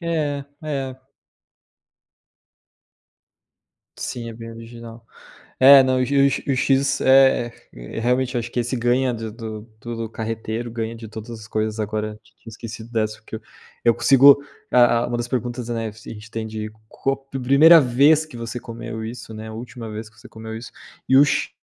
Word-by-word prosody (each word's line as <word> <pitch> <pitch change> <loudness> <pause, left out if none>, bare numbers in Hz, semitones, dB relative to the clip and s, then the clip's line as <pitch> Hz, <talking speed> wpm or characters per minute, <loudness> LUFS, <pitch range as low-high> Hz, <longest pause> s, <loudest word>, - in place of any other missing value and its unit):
É, 150 -5 -2 0.2
é. 135 -4 -4 3.0
Sim, 120 -1 -5
é 115 - -6
bem 115 0 -9
original. 115 0 -11 0.5
É, 135 +1 +9
não, 130 0 +1
e - - +2
o 140 +1 +3
e 140 0 -1
o 130 - 0
X 135 +1 +2
É, 130 -2 +5 0.5
realmente 125 +2 0
acho 120 0 -3
que 120 - -1
esse 120 +2 -2
ganha 125 +2 +1
do 110 -1 -6
do 110 -2 -7 0.4
do 115 -1 -4
Carreteiro, 115 +1 -4
ganha 115 0 -4
de 115 -1 -10
todas 110 +2 -9
as 110 -2 -9
coisas. 110 0 -2
Agora, 105 0 -3
ti 110 - -26
tinha 115 - -13
esquecido 115 +1 -9
dessa, 110 -2 -1
porque 110 - -9
eu - - -10 0.4
eu 115 -1 +5
consigo 140 +1 +6 0.3
Ah 120 -1 +5
ah, - - -1
uma 120 - -2
das 120 0 -3
perguntas, 120 -1 -3
né, 115 -2 -3
se 110 +1 -12
a - - -5
gente 110 0 -11
tem 110 0 -4
de 110 0 -5 0.2
co 135 +4 -2
primeira 135 +5 +5
vez 145 +4 +4
que 150 -6 -12
você 115 +1 -5
comeu 115 -1 -7
isso, 115 0 -8
né, 110 0 -8
a - - -8
última 115 0 -8
vez 110 +1 -7
que 110 - -27
você 125 - -14
comeu 110 0 -8
isso, 115 +1 -9 0.4
e 130 - +5
o 140 - +8
X 145 - -1
120 Hz, 185 wpm, -22 LUFS, 110-130 Hz, 3.0 s, É